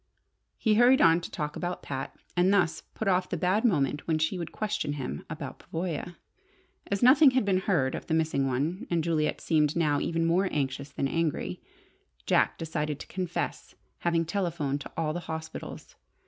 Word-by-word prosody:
He 220 - +2
hurried 245 +4 +6
on 165 +1 +5
to - - -6
talk 150 0 -4
about 180 0 -4
Pat, 135 -1 -5 0.2
and 180 +2 +4
thus 195 -5 +2
put 220 - -3
off 185 -1 +2
the 180 - -2
bad 185 +6 +1
moment 145 - +1
when 160 -2 +2
she 160 +4 0
would 170 - -5
question 210 -9 -2
him 135 -4 -5
about 155 -4 -6
Pavoya. 170 0 -4 0.7
As 200 +2 -1
nothing 275 +4 +8
had 255 - +3
been 190 -2 +2
heard 165 -10 +1
of - - -6
the 160 - +1
missing 155 -4 +1
one 145 +9 -2
and 170 -2 +1
Juliet 155 -2 0
seemed 150 -2 +2
now 150 -4 +2
even 165 0 0
more 180 +3 +2
anxious 140 -1 -2
than 140 -1 -2
angry, 165 0 -2 0.6
Jack - - +2
decided 150 -3 -3
to - - -7
confess 180 -2 -4 0.2
having 170 -1 +1
telephoned 165 -6 -1
to - - -9
all 155 -2 0
the 175 - -3
hospitals. 160 0 -7
165 Hz, 180 wpm, -28 LUFS, 150-185 Hz, 0.7 s, nothing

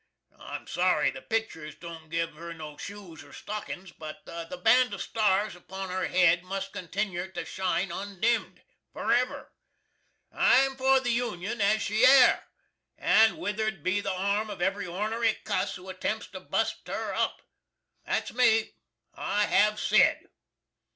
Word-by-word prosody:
I'm - - -7
sorry - - +2
the - - -9
picters 220 -9 -3
don't 165 -2 -10
give 165 0 -2
her 170 +2 -8
no 155 -2 -8
shoes 190 -3 -9
or 145 - -16
stockins, 195 -3 -6
but 160 +5 -9
the 170 +2 -7
band 250 -1 +5
of 195 - -7
stars 210 -2 +1
upon 190 +2 -7
her 185 +1 -1
hed 175 -1 +4
must 195 +1 -5
continner 185 0 -3
to - - -4
shine 190 0 -1
undimd, 200 +5 -2 0.3
forever. - - 0 0.8
I'm 270 +1 +4
for 265 0 +4
the 245 -2 0
Union 230 -3 -2
as 210 +2 +3
she 215 +3 0
air, 260 0 +6 0.5
and 220 -4 +4
withered 210 -3 -2
be 190 +3 +1
the 195 - -2
arm 200 +3 0
of 205 - -7
every 190 +1 -1
ornery 215 +5 0
cuss - - -1
who 180 +1 -11
attempts 190 +4 -3
to - - -7
bust - - -2
her - - -3
up. - - -1 0.6
That's - - -2
me. 230 -3 +3 0.4
I 205 +1 0
hav 210 +1 +3
sed! - - +3
195 Hz, 150 wpm, -28 LUFS, 175-220 Hz, 0.8 s, air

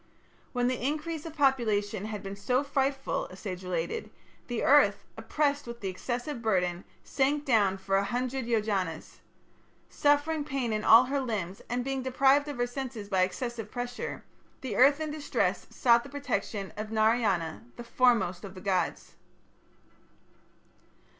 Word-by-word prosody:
"When 245 -1 0
the 250 -1 -2
increase 310 +3 -2
of 320 - -9
population 220 -8 +1
had 210 -2 -5
been 195 0 -6
so 250 +7 0
frightful," 275 -1 -1
a 185 - -12
sage 185 -2 -6
related, 170 -2 -3 0.4
"the 240 -2 -2
Earth, 275 -8 +5
oppressed 285 +5 -1
with 235 0 -7
the 195 - -3
excessive 240 +7 -4
burden, 180 -5 0 0.2
sank 285 +2 0
down 205 -7 +3
for 195 0 0
a 195 - +2
hundred 250 +3 -2
Yojanas. 200 -8 -1 0.7
Suffering 290 +1 +2
pain 270 -6 -2
in 215 0 -1
all 230 +2 +8
her 275 +2 -1
limbs, 205 -8 -3
and 245 0 -1
being 270 -1 -2
deprived 270 +3 +3
of 290 -3 -5
her 245 - +1
senses 245 -5 -6
by 190 -2 +2
excessive 225 +4 -2
pressure, 245 +1 -5 0.4
the 255 -6 -4
Earth 280 +6 +5
in 310 -1 -3
distress 300 -1 -1
sought 235 -1 +4
the - - -11
protection 230 -8 -3
of 215 +1 -5
Narayana, 215 -7 +1
the 240 - -8
foremost 230 -7 +2
of 195 -1 -9
the - - -8
gods." 185 -3 -1
240 Hz, 155 wpm, -29 LUFS, 200-270 Hz, 0.7 s, all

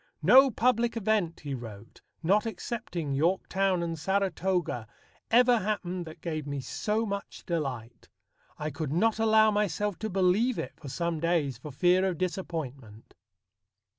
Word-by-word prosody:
"No 270 +1 +8
public 235 -1 +1
event," 210 -6 0
he 145 -2 -5
wrote, 115 -4 -9 0.2
"not 205 +7 +3
excepting 180 -8 -4
Yorktown 185 +4 +1
and 165 -1 -3
Saratoga, 185 - -1 0.4
ever 245 0 +5
happened 185 -4 -3
that 160 - -11
gave 155 -3 -4
me 140 -1 -3
so 210 - -1
much 200 -1 -6
delight. 130 -9 -4 0.5
I 150 +1 -3
could 145 0 -4
not 220 +7 +2
allow 220 -1 +5
myself 205 -1 -1
to 220 - -3
believe 195 +6 +2
it - - -4
for 145 - -10
some 170 +2 -2
days 155 -7 0
for 150 - -8
fear 180 +7 +3
of 180 -3 -2
disappointment." 140 - -5
180 Hz, 140 wpm, -28 LUFS, 150-210 Hz, 0.5 s, No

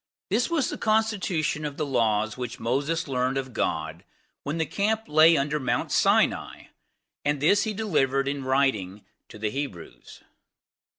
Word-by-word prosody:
This 235 +4 +1
was 330 -5 0
the - - -6
constitution 210 -9 0
of 145 -1 -5
the 155 - -1
laws 110 -5 +1
which 125 -1 -6
Moses 145 +8 -1
learned 130 0 0
of 130 -2 -4
God - - -2 0.4
when 150 +3 -4
the 160 - 0
camp 215 +4 -1
lay 160 +2 +5
under 145 +2 0
Mount 130 - -1
Sinai, - - +1 0.5
and 145 0 0
this 200 +10 +3
he 215 - -2
delivered 135 -10 +1
in 140 -1 -2
writing 120 -8 0 0.2
to 110 - -11
the 105 0 -2
Hebrews. 135 - -7
140 Hz, 155 wpm, -26 LUFS, 130-165 Hz, 0.5 s, lay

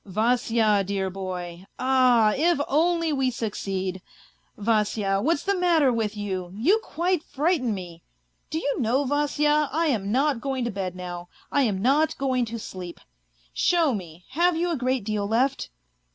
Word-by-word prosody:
" - - -44
Vasya, 220 0 +2
dear 190 -1 -2
boy! 180 -1 -6
Ah, 255 -4 +4
if 335 +2 +2
only 330 +1 +2
we 265 -2 +1
succeed! 195 -5 -3 0.6
Vasya, 210 -2 +1
what's 305 +4 +1
the 400 - +1
matter 335 -8 +3
with 220 -2 -2
you, 190 -3 -4
you 340 - +3
quite 360 -5 -1
frighten 290 -4 0
me! 175 -3 -9 0.5
Do 315 - -2
you 285 -3 -1
know, 250 +5 +1
Vasya, 295 +1 +1
I 325 +2 +1
am 205 -6 -1
not 270 0 +1
going 265 -3 -2
to 235 - -2
bed 190 -2 -4
now, 175 -1 -7 0.2
I 285 - +2
am 190 -1 -3
not 290 +5 +2
going 260 -3 0
to 230 +1 -6
sleep! 185 -5 -8 0.5
Show 330 -6 +2
me, 175 -4 -7
have 340 +4 +2
you 350 +1 0
a - - 0
great 255 -3 -1
deal 205 -1 -2
left 245 +5 0
240 Hz, 165 wpm, -25 LUFS, 195-295 Hz, 0.6 s, Ah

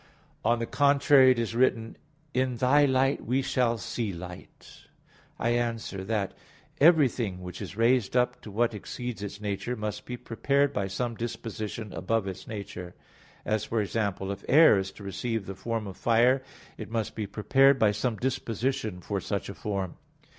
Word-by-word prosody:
On 115 +2 +3
the 115 - -2
contrary, 140 0 +5
It 130 - +4
is 115 -1 -1
written: 115 -2 +1 0.4
"In 130 -1 0
Thy 135 +4 +4
light 135 0 +2
we 130 +4 0
shall 120 -3 +1
see 110 +1 -3
light" 90 0 -9
(Ps. - - -17 0.5
35:10). - - -3
I - - +3
answer 115 -5 -1
that, 105 -1 -1 0.5
Everything 130 - +4
which 90 0 -7
is 100 - -7
raised 120 0 +3
up 125 0 +1
to 115 - -10
what 115 +3 +1
exceeds 120 +2 -6
its 105 0 -6
nature, 105 +4 -3
must 105 -2 -4
be 125 - -4
prepared 140 +4 +1
by 100 -1 -1
some 115 +5 -2
disposition 110 -2 -5
above 110 +2 0
its 95 0 -7
nature; 100 -4 -7 0.5
as, 110 -1 0
for 115 - -1
example, 100 -2 -1
if 100 0 -6
air 150 -8 +7
is 95 0 -4
to 105 - -12
receive 100 +2 -3
the 100 - -5
form 115 +2 -3
of 95 -2 -8
fire, 120 +3 +3 0.4
it 110 - -6
must 115 -2 -2
be 110 -2 -4
prepared 135 +7 +4
by 110 -4 +4
some 110 +3 -1
disposition 120 -5 -2
for - - -3
such - - -3
a - - -5
form. 95 -4 -4
115 Hz, 175 wpm, -28 LUFS, 100-125 Hz, 0.5 s, air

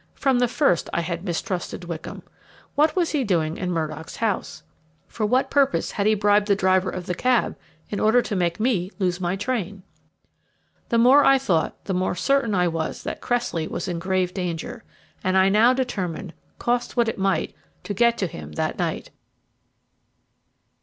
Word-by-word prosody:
From 265 -3 +2
the 245 - +3
first 240 - +1
I - - +1
had 170 +1 -4
mistrusted 180 0 -3
Wickham. 170 -2 -7 0.5
What 300 +2 +3
was 350 -3 +1
he 295 -4 +1
doing 165 -7 0
in 180 -1 -2
Murdock's 160 -1 -4
house? 220 -4 -2 0.4
For 215 -2 -2
what 255 +4 +1
purpose 275 -1 +2
had 200 0 0
he 215 - +4
bribed 205 0 +3
the 200 - +4
driver 185 -1 +2
of 180 -1 -5
the 180 - -2
cab 250 +5 +1 0.3
in 205 - -4
order 220 +3 +4
to 210 - -3
make 175 -1 0
me 215 -6 +1
lose 185 -2 -1
my 175 +1 0
train? 200 -3 -3 1.1
The 235 - +2
more 260 +5 +6
I 275 - +6
thought, 185 -12 -1
the 195 - -2
more 185 0 0
certain 270 +1 +1
I 180 -1 +3
was 165 -1 -3
that - - -5
Cressley 235 -10 -1
was - - -4
in 175 -2 -3
grave 185 0 0
danger; 180 +5 -4 0.4
and 185 -1 +2
I 190 0 +5
now 220 +5 +5
determined, 195 -9 -3 0.2
cost 240 +1 -1
what 235 -1 +3
it 225 - -3
might, 195 0 0 0.3
to 205 - -4
get 235 +3 +3
to 195 - 0
him 75 - -8
that - - -2
night. - - -2
195 Hz, 180 wpm, -23 LUFS, 180-240 Hz, 1.1 s, more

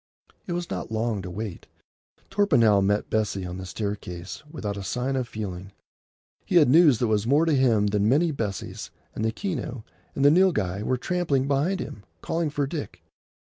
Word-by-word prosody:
It 175 - -2
was 175 0 -4
not - - -4
long 110 -2 -1
to 90 - -6
wait. 100 0 -6 0.6
Torpenhow 115 - +4
met 105 +2 0
Bessie 105 -3 0
on 90 +1 -6
the 95 - -7
staircase 100 -3 -5
without 110 -10 -4
a 100 - -5
sign 125 +7 -2
of 130 -2 -1
feeling. 95 -3 -6 0.7
He 185 - -3
had 155 -6 +6
news 150 -3 +6
that 120 - +1
was 110 -1 +1
more 145 +5 +4
to 160 - +2
him 120 -6 +3
than 105 +1 +2
many 160 +6 +3
Bessies, 105 -8 -4 0.2
and 110 - -4
the 110 - +1
Keneu 130 - -4 0.3
and 140 - +1
the 145 - +8
Nilghai 110 - +2
were 130 +4 0
trampling 145 -3 0
behind 150 +8 +1
him, 105 - -6 0.2
calling 165 -2 -1
for 145 -1 -1
Dick. 145 +1 -6
120 Hz, 180 wpm, -25 LUFS, 105-150 Hz, 0.7 s, the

